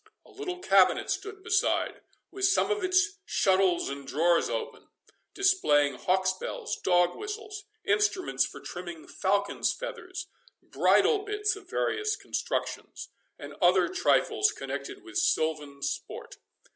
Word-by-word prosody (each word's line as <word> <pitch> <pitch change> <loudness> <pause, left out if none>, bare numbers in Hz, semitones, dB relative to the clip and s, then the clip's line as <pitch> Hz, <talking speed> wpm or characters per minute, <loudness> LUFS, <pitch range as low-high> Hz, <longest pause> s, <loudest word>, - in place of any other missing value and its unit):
A - - -18
little 370 -3 -5
cabinet 370 +3 +3
stood 410 -2 -5
beside, 430 0 +1 0.3
with 390 -1 -1
some 390 +2 +3
of 420 -2 -1
its 375 +2 +2
shuttles 190 - +2
and 140 0 -6
drawers 170 +4 +2
open, - - -5 0.5
displaying 260 - +3
hawks 185 +8 +1
bells, 185 - -5
dog 175 -1 +2
whistles, 420 -1 -7 0.2
instruments 415 -2 +1
for - - -6
trimming 175 -2 -8
falcons' 200 +1 0
feathers, 370 -8 -6 0.4
bridle 435 - +3
bits 415 0 -1
of 405 -3 -14
various 425 +3 0
constructions, - - -4 0.3
and - - -9
other - - +5
trifles 420 +3 +2
connected 395 -1 -6
with 360 +1 -6
silvan 150 - 0
sport. 140 - -5
370 Hz, 125 wpm, -28 LUFS, -, 0.5 s, other